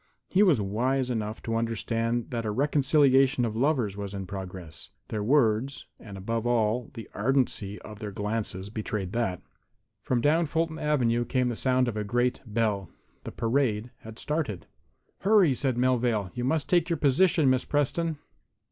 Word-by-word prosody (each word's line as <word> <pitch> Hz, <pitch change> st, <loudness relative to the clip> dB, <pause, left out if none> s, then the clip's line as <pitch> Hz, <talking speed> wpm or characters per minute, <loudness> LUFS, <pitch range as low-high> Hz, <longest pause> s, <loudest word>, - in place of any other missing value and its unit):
He 190 Hz, -, +3 dB
was 175 Hz, -, +5 dB
wise 125 Hz, +6 st, 0 dB
enough 110 Hz, -2 st, -3 dB
to 115 Hz, -, -3 dB
understand 115 Hz, +1 st, -1 dB
that 115 Hz, -2 st, -2 dB
a 110 Hz, -, -2 dB
reconciliation 135 Hz, 0 st, +3 dB
of 110 Hz, -2 st, -3 dB
lovers 125 Hz, -5 st, +1 dB
was 100 Hz, -1 st, -6 dB
in 95 Hz, -1 st, -4 dB
progress. 90 Hz, -4 st, -8 dB, 0.2 s
Their 110 Hz, -, -2 dB
words, 125 Hz, +1 st, +2 dB
and, 100 Hz, -3 st, -10 dB
above 115 Hz, +4 st, -2 dB
all, 115 Hz, 0 st, +1 dB
the 115 Hz, -, -8 dB
ardency 125 Hz, -7 st, 0 dB
of 105 Hz, -1 st, -10 dB
their 105 Hz, -, -5 dB
glances 105 Hz, -1 st, -3 dB
betrayed 105 Hz, -4 st, -3 dB
that. 110 Hz, -6 st, -2 dB, 0.6 s
From 120 Hz, +5 st, 0 dB
down 160 Hz, +6 st, +2 dB
Fulton 160 Hz, +1 st, -1 dB
avenue 120 Hz, -6 st, +1 dB
came 125 Hz, +1 st, 0 dB
the 120 Hz, -, -3 dB
sound 130 Hz, +1 st, +1 dB
of 110 Hz, -3 st, -3 dB
a 105 Hz, -, -1 dB
great 120 Hz, +4 st, 0 dB
bell. 105 Hz, -3 st, -1 dB, 0.4 s
The -, -, -5 dB
parade 115 Hz, -1 st, 0 dB
had 110 Hz, 0 st, -11 dB
started. 145 Hz, -, -3 dB, 0.5 s
"Hurry," 195 Hz, -7 st, +4 dB
said 130 Hz, -1 st, -1 dB
Melvale, 120 Hz, -6 st, +1 dB
"you 125 Hz, -1 st, -3 dB
must 155 Hz, +3 st, 0 dB
take 175 Hz, -1 st, +2 dB
your 170 Hz, -, 0 dB
position, 150 Hz, +2 st, +3 dB
Miss 130 Hz, -1 st, +3 dB
Preston." 155 Hz, +2 st, 0 dB
120 Hz, 165 wpm, -27 LUFS, 105-135 Hz, 0.6 s, was